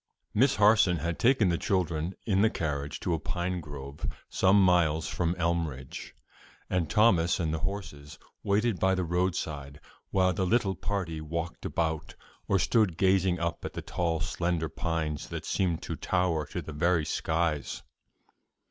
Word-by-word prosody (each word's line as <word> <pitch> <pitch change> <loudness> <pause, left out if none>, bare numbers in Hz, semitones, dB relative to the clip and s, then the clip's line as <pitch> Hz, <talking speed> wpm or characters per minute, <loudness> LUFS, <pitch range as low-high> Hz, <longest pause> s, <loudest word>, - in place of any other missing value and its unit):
Miss 135 +6 +4
Harson 105 -4 +5
had 85 +2 -3
taken 115 -5 +4
the 85 - 0
children 90 -2 -1
in 100 -3 +2
the 110 - +5
carriage 75 -6 -3
to 85 - 0
a 80 - 0
pine 90 +3 -2
grove 70 -1 -7 0.2
some 95 +2 +4
miles 80 -4 +3
from 85 0 -1
Elmridge, 80 -6 -3 0.6
and 85 -4 0
Thomas 100 -7 +4
and 80 -3 0
the 80 - -1
horses 90 -7 -5 0.2
waited 105 +1 +1
by 95 0 +3
the 95 - -1
roadside 80 -5 -2 0.3
while 95 -1 +2
the 95 - -1
little 100 0 +2
party 90 -6 -3
walked 85 +2 -4
about 80 -2 -2 0.3
or 100 - +3
stood 95 -2 +2
gazing 95 -2 +3
up 85 -1 -2
at - - -5
the - - -6
tall 85 -2 -1
slender 85 -1 -1
trees 80 -2 -2
that - - -5
seemed 90 -4 0
to - - -4
tower 85 -5 0
to 90 +2 -5
the 80 - -7
very 85 +1 +2
skies. 80 -4 -1
85 Hz, 155 wpm, -29 LUFS, 80-95 Hz, 0.6 s, Harson